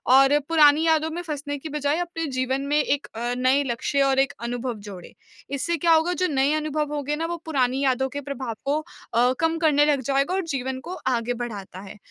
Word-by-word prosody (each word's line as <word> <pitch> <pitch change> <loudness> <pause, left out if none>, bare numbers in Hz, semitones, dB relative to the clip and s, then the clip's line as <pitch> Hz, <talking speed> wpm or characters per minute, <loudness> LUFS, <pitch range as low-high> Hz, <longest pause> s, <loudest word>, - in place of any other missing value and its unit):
और 275 +2 +6
पुरानी 300 -3 +7
यादों 320 -1 +2
में 345 - -4
फँसने 290 -3 -4
की 310 +3 -8
बजाय 295 0 0
अपने 335 -2 -3
जीवन 260 +1 0
में 295 +1 +2
एक 285 +1 -1
अ, 240 +2 -2
नए 260 +3 +3
लक्ष्य 265 +2 -1
और 270 -1 +2
एक 270 -1 +2
अनुभव 245 +1 -3
जोड़ें। 185 -4 -9 0.4
इससे 340 +5 -1
क्या 335 +2 +2
होगा 325 +2 +3
जो 365 - +2
नए 275 0 +2
अनुभव 305 -1 -1
होंगे 295 0 -2
ना 325 +2 -2
वो 345 +1 -3
पुरानी 265 -4 +1
यादों 265 0 +2
के 285 +2 -5
प्रभाव 270 -4 -5
को 285 +2 +1 0.4
अ, 245 +2 +4
कम 325 0 +1
करने 295 -3 +4
लग 290 -3 +2
जाएगा 275 +6 0
और 385 - +1
जीवन 260 0 -3
को 360 - -5
आगे 245 -1 0
बढ़ाता 215 -6 -6
है 200 +1 -11
280 Hz, 215 wpm, -24 LUFS, 255-310 Hz, 0.4 s, पुरानी